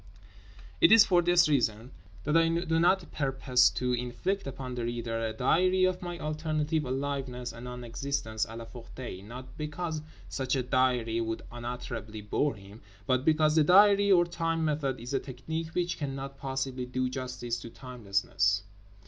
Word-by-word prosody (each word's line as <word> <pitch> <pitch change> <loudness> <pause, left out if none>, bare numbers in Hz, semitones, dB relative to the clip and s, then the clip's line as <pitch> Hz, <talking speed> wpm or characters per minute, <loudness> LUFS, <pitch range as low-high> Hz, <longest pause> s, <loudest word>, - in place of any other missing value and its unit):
It - - +7
is 220 -2 +9
for 180 -4 +4
this 175 0 +4
reason 120 -4 0 0.3
that 150 +2 0
I 165 0 +5
do 165 -1 +1
not 175 +1 +2
purpose 135 -3 +3
to 125 0 0
inflict 125 +10 -2
upon 130 -1 -6
the 120 -1 -3
reader 115 -1 -3
a 115 -1 -1
diary 185 +11 +2
of 185 -1 +1
my 175 -1 -5
alternative 155 0 -1
aliveness 130 -2 -3
and 115 +1 -9
non 125 0 -7
existence 115 -2 -2
at 115 +1 -8
La 115 - -7
Ferté—not 120 +1 -9
because 155 +1 -3 0.3
such 130 0 -1
a 130 - 0
diary 125 -3 +1
would 115 0 -3
unutterably 120 -3 -6
bore 115 +6 0
him, 100 +2 -13 0.2
but 130 -1 +1
because 155 0 +3
the 160 - +6
diary 200 +4 +6
or 175 -2 +6
time 165 -1 -1
method 145 -4 -1
is 120 +4 -7
a 135 - +2
technique 160 +6 -6
which 175 -1 -1
cannot 135 -1 -4
possibly 135 -2 -3
do 130 0 -1
justice 125 -2 -4
to 115 - -9
timelessness. 100 -5 -1
130 Hz, 165 wpm, -29 LUFS, 120-160 Hz, 0.3 s, is